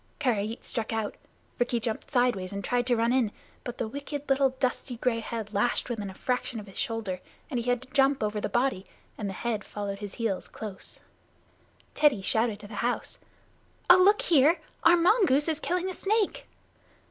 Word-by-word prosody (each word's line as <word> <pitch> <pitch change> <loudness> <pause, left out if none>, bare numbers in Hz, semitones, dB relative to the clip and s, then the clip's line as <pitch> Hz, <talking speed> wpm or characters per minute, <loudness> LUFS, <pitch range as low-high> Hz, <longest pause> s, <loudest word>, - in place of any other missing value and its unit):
Karait 225 -5 -1
struck 230 -2 -1
out. 220 -2 -1 0.5
Rikki 245 -1 +1
jumped 225 -1 -3
sideways 245 -8 +1
and 200 0 -4
tried 245 +2 0
to 245 - +4
run 230 +1 +2
in, 245 -5 +2 0.3
but 245 0 -6
the 235 - -2
wicked 285 +4 -6
little 270 0 +4
dusty 255 -1 -1
gray 235 -1 +1
head 225 -2 -5
lashed 240 +4 +1
within 210 -4 -3
a 190 - -10
fraction 250 0 -2
of 210 - -8
his 195 - -10
shoulder, 220 -6 -2 0.3
and 250 - 0
he 235 +1 -2
had 245 +1 +1
to 260 - -16
jump 275 -2 +3
over 210 0 -1
the - - -2
body, 240 -7 0 0.3
and 205 -2 -4
the - - -4
head 220 0 -2
followed 200 -1 -5
his 205 -2 -7
heels 220 -5 -2
close. 205 -3 -7 0.9
Teddy 285 -10 +3
shouted 220 0 +1
to 205 - -9
the 205 -1 -8
house: 245 +1 -2 0.7
"Oh, 360 - +10
look 400 +3 +5
here! 320 +1 +5 0.2
Our 345 +1 +7
mongoose 340 - +4
is 315 -2 0
killing 360 +2 -1
a 375 - -3
snake." 415 +2 0
240 Hz, 190 wpm, -28 LUFS, 215-275 Hz, 0.9 s, Oh